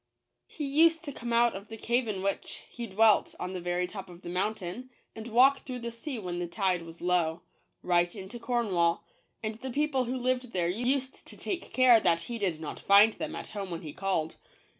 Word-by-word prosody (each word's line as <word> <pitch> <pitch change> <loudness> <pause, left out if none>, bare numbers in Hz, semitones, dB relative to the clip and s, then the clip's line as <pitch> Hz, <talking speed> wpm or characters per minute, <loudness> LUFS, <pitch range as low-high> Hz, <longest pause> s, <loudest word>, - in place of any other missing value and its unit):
He 300 - -5
used 325 +4 +4
to 290 - -5
come 235 -3 -6
out 235 -1 +4
oi - - -3
the 225 0 -9
cave 240 +2 0
in 195 -3 -3
whicn 195 0 -3
he 235 -1 -7
dwelt 215 +1 +3
on 180 +1 -4
the 180 - -4
very 175 +1 0
top 190 +1 -8
of 175 0 -13
the 175 - -6
mountain, 195 +5 -3 0.3
and 220 +1 -7
walk 260 +4 +5
through 255 -1 -6
the 235 -1 -5
sea 240 +3 -6
when 180 -4 -4
the 175 - -2
tide 185 -1 0
was 165 0 -11
low, 175 -2 +1 0.4
right 175 +1 +2
into 195 +4 -7
Cornwall; 210 -8 +1 0.4
and 215 0 -2
the 260 - -5
people 275 -1 0
who 250 +2 -2
lived 250 -1 -1
there 175 -2 +1
used 255 +6 -2
to - - -9
take 360 -3 -4
care 255 -3 +6
that 170 -5 +2
he 230 +6 -5
did 180 -6 -1
not 155 - -6
find 205 +2 +6
them - - -5
at - - -6
home 200 -3 -5
when 170 -1 -5
he 150 -2 -7
called. 185 -5 -2
215 Hz, 215 wpm, -29 LUFS, 180-245 Hz, 0.4 s, care